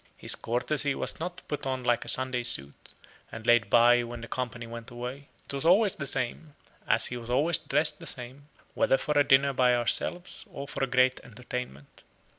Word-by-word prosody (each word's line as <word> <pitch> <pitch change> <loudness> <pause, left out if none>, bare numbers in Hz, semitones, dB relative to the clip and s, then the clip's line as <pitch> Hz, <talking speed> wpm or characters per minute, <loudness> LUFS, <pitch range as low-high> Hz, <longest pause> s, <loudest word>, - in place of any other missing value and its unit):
His - - -6
courtesy 140 +4 -1
was - - -5
not 175 +2 -6
put 145 -2 -3
on 130 -1 -2
like 120 -1 +1
a - - -14
Sunday 130 -1 -1
suit, 70 - 0 0.4
and 115 0 -8
laid 120 -3 +4
by 120 +2 +6
when 120 0 -7
the 115 - -8
company 125 -2 -4
went 115 0 -8
away; 125 +3 -7 0.2
it - - -8
was 140 - -3
always 195 +4 +4
the 140 - -5
same; 135 +3 -1 0.3
as - - +2
he 125 - -5
was 120 0 -9
always 150 +6 +2
dressed 150 +2 +2
the - - -9
same, 130 +3 -8 0.3
whether 135 - +3
for 150 - -3
a 145 - +5
dinner 140 0 +4
by 125 -1 +3
ourselves 175 +9 -2
or 140 - -7
for 140 - -3
a - - +1
great 130 0 +3
entertainment. 120 - -8
130 Hz, 200 wpm, -28 LUFS, 120-140 Hz, 0.4 s, by